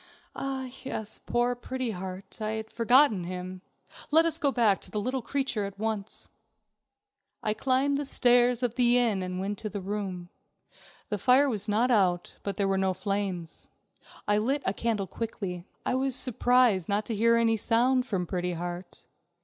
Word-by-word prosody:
"Ah, 270 -1 -3 0.2
yes, 220 -5 -6
poor 240 +1 +1
Pretty 255 0 -4
Heart. 190 +2 -6
I 215 0 -1
had 220 0 -5
forgotten 235 -3 +4
him. 185 +1 -6 0.5
Let 320 +2 +5
us 330 -1 +2
go 285 -4 +2
back 225 -6 +3
to - - -7
the 210 - -3
little 255 +5 -2
creature 265 -4 -1
at 200 0 -8
once." 215 -1 -3 1.1
I 215 - +1
climbed 270 +4 +1
the 290 - -3
stairs 245 -1 +3
of 240 -2 +1
the 245 -1 +4
inn 230 -5 +2
first 185 - -3
and 180 0 -4
went 200 +1 -3
into 215 - -4
the 205 - -5
room. 190 -3 -4 0.8
The 210 - -2
fire 260 +6 +5
was 215 -5 -2
not 230 +5 +2
out, 180 -6 +1
but 200 -2 -4
there 200 - +1
were 195 0 +1
no 190 -1 +1
flames. 190 -4 -4 0.6
I 205 0 +3
lit 270 +6 0
a 190 - +1
candle 220 -3 -1
quickly. 190 -5 -5 0.2
I - - 0
was 260 0 0
surprised 245 -7 +2
not 205 +1 +1
to 225 - -3
hear 230 +2 +4
any 230 -1 +3
sound 250 +4 +2
from 190 -6 -1
Pretty 180 0 -2
Heart. 175 +1 -6
220 Hz, 180 wpm, -28 LUFS, 195-250 Hz, 1.1 s, Let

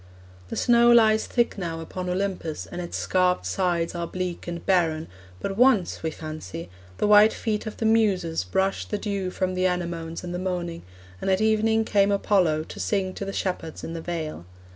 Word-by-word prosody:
The - - -5
snow 240 -1 +5
lies 220 -2 +5
thick 240 -4 0
now 165 -3 -3
upon 180 +3 -5
Olympus, 180 -4 -2
and 180 - -6
its 175 - -4
scarped 180 -1 +1
sides 175 -3 0
are 170 -1 -3
bleak 180 -1 -4
and 170 -1 -5
barren, 165 -4 +2 0.3
but 195 - -3
once, 245 -7 +3
we 160 - -1
fancy, 155 - -7 0.3
the - - +1
white 210 +1 +7
feet 215 -1 -2
of 215 - -6
the 225 - -2
Muses 200 - +2
brushed 190 - -1
the 210 - -1
dew 200 -2 -2
from 185 0 -2
the 185 0 +2
anemones 170 -2 -3
in 175 - -5
the 175 - -3
morning, 175 -2 -3 0.4
and - - -1
at 190 0 +3
evening 220 +1 +2
came 200 -2 +3
Apollo 185 -6 +2
to - - -10
sing 190 -3 -1
to 200 - -5
the 195 - -4
shepherds 180 -5 -3
in 165 - -5
the 165 - -5
vale. 155 - -5
185 Hz, 190 wpm, -25 LUFS, 170-205 Hz, 0.4 s, white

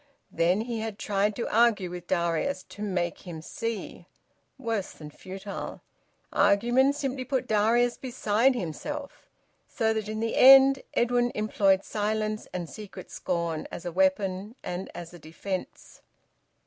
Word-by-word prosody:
Then 175 +5 +2
he 230 0 -3
had 220 -2 -4
tried 205 0 0
to 235 - -3
argue 215 -5 +3
with 175 0 -8
Darius, 175 - 0
to 205 - -10
`make 180 -4 -1
him 175 -4 -8
see'! 230 +7 -5 0.5
Worse 230 -7 -3
than 150 -1 -10
futile! 195 +4 -7 0.5
Argument 240 +7 +4
simply 270 -2 -3
put 255 0 -1
Darius 230 +3 +3
beside 250 0 +1
himself. 280 - -6 0.4
So 220 -1 0
that 215 -1 -3
in 215 0 -3
the 225 0 -1
end 270 0 +8
Edwin 240 0 +2
employed 195 -2 +2
silence 215 0 -2
and 175 -2 -4
secret 200 0 -10
scorn, 170 -3 -2
as 170 - -7
a 175 - -3
weapon 190 +3 0
and 180 +2 -4
as 170 0 -8
a 175 - -11
defence. 180 +5 -6
210 Hz, 140 wpm, -27 LUFS, 185-240 Hz, 0.5 s, end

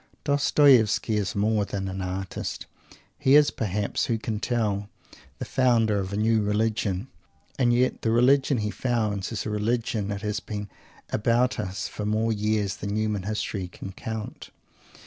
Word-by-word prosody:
Dostoievsky 140 -6 +4
is 100 -3 -2
more 105 +1 +2
than 100 -1 -4
an 95 0 -4
artist. 95 0 -4 0.5
He 135 +2 +5
is, 150 -1 +6
perhaps 105 -1 -1
who 115 - +1
can 110 -1 -3
tell? 105 -4 -1 0.5
the - - -5
founder 115 -5 +2
of 95 -1 -4
a 100 - -2
new 110 +1 +3
religion. 105 0 0 0.5
And 120 -2 +4
yet 125 +2 +1
the 115 - 0
religion 130 +4 +4
he 105 -1 -1
"founds" 110 -6 -1
is 110 -4 -3
a 105 - -3
religion 110 0 -1
which 100 -1 -4
has 105 0 -1
been 105 -2 -6 0.4
about 120 +3 +1
us 95 -2 -3
for 105 - -6
more 110 +1 +1
years 105 -1 0
than 100 0 -4
human 105 -2 0
history 100 -1 -3
can 95 +2 -9
count. 110 +2 -6
110 Hz, 160 wpm, -26 LUFS, 100-115 Hz, 0.5 s, is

